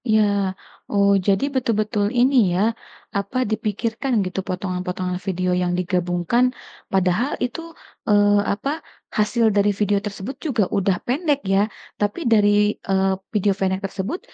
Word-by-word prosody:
Iya, 215 0 +5 0.7
oh 200 -1 +3 0.2
jadi 195 +4 +3
betul-betul 215 -4 0
ini 260 +3 +4 0.2
ya, 180 - +1 0.6
apa 200 +5 -3
dipikirkan 220 +4 -2
gitu 185 +1 -3
potongan-potongan 180 -1 -3
video 185 -1 -1
yang 180 0 0
digabungkan 180 +4 +1 0.5
padahal 190 +8 +2
itu, 250 +6 -5 0.5
eee, 205 0 +5 0.2
apa 210 +7 -3 0.5
hasil 225 +2 +2
dari 205 0 +4
video 205 -1 +2
tersebut 205 +5 -5
juga 240 -8 +1
udah 195 -1 +2
pendek 290 +3 +1
ya 195 - +4 0.4
tapi 205 +8 0
dari, 210 -2 +5 0.4
eee, 190 0 +2 0.2
video 205 -1 +2
pendek 190 0 0
tersebut 200 - -4
205 Hz, 130 wpm, -22 LUFS, 190-225 Hz, 0.7 s, Iya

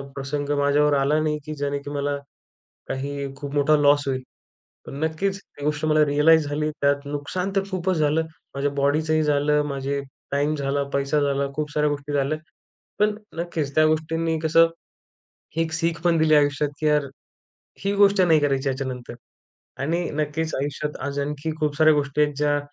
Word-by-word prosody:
प्रसंग 140 +1 -3
माझ्यावर 145 +1 +3
आला 140 +3 +2
नाही 155 -1 0
की 155 - -5
जेणे 140 0 -2
की 140 - -9
मला 145 0 -1 0.7
काही 140 0 -4
खूप 140 0 -7
मोठा 145 +1 +4
लॉस 145 0 +4
होईल. 130 -1 -1 0.6
पण - - -8
नक्कीच 190 +5 -1
ती 145 - -14
गोष्ट 150 0 0
मला 155 -1 +4
रियलाइज 150 +2 +4
झाली, 150 +1 -1
त्यात 140 -1 0
नुकसान 145 +7 -3
तर 195 - +2
खूपच 185 -1 0
झालं 155 +1 +2 0.3
माझ्या 140 +1 0
बॉडीचंही 155 +2 +2
झालं 150 0 +2
माझे 140 0 -2 0.3
टाईम 145 +2 +1
झाला, 140 0 -1
पैसा 140 +2 +1
झाला, 140 -1 +1
खूप 150 0 -3
साऱ्या 150 0 +1
गोष्टी 145 0 -4
झाल्या. 140 +2 +1 0.6
पण 210 0 +3 0.2
नक्कीच 160 -5 -3
त्या 155 - +5
गोष्टींनी 160 +1 0
कसं 165 +1 +5 0.9
ही 165 0 +1
सीख 165 0 0
पण 170 -1 +3
दिली 155 -1 +4
आयुष्यात 145 0 +2
की 155 - 0
यार 150 -1 +3 0.8
ही 200 - +2
गोष्ट 200 -1 +5
नाही 165 -4 +5
करायची 140 -1 +1
ह्याच्यानंतर 130 -2 -4 0.7
आणि 170 +5 -1
नक्कीच 155 +2 -2
आयुष्यात 145 +2 -3
आज 140 0 -3
आणखी 145 +2 -3
खूप 150 -1 0
साऱ्या 155 0 +6
गोष्टी 145 0 0
आहेत 150 0 +2
ज्या 145 0 +2
150 Hz, 170 wpm, -24 LUFS, 140-155 Hz, 0.9 s, साऱ्या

